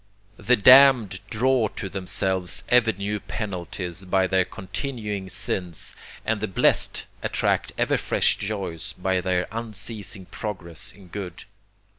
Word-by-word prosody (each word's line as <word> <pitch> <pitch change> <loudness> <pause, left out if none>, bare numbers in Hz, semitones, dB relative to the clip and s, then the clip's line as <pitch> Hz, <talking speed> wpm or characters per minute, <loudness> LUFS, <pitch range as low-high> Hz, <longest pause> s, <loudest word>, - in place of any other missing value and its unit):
The 125 - +3
damned 125 -4 +7
draw 125 0 +2
to 95 - -4
themselves 95 -1 -1
ever 120 -2 +5
new 100 +1 -3
penalties 95 -3 -5
by 95 0 +2
their 95 -1 +2
continuing 105 -1 -5
sins, 95 -2 -2 0.3
and 110 -2 -1
the 110 - -1
blest 95 - +3 0.2
attract - - 0
ever - - +2
fresh - - +3
joys 100 -3 -4
by 95 0 -1
their 90 0 0
unceasing 110 -3 -5
progress 90 -6 -5
in 95 -3 -17
good. 90 -2 -7
100 Hz, 125 wpm, -24 LUFS, 95-110 Hz, 0.3 s, damned